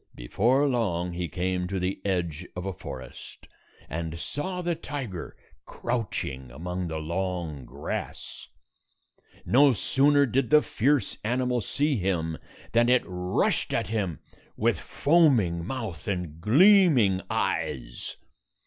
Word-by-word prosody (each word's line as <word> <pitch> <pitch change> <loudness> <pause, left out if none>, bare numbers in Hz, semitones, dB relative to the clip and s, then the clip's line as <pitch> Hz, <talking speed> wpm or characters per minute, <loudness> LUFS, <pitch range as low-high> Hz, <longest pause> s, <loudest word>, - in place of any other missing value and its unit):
Before 120 - +2
long, 90 -9 0
he 85 0 -3
came 90 +1 -1
to 95 0 -2
the 95 +1 -2
edge 90 -3 -2
of 90 +1 -5
a 95 - -2
forest, 65 -9 -10 0.4
and 80 +1 -4
saw 180 - -4
the 175 0 +1
tiger 140 - -6 0.3
crouching 100 - -3
among 90 +7 -4
the 80 -1 -3
long 85 -3 -3
grass. 70 +5 -6 1.0
No 135 +2 +5
sooner 140 +6 +3
did 130 0 0
the 150 0 +6
fierce 135 -1 +1
animal 125 +2 0
see 145 +5 0
him 85 -5 -1 0.3
than 120 +1 +4
it 125 0 +4
rushed 90 0 0
at - - -1
him 100 -8 -1 0.4
with - - +1
foaming 130 - +3
mouth 110 - -5
and 90 -5 -3
gleaming 135 - +5
eyes. - - -2
95 Hz, 120 wpm, -27 LUFS, 85-130 Hz, 1.0 s, the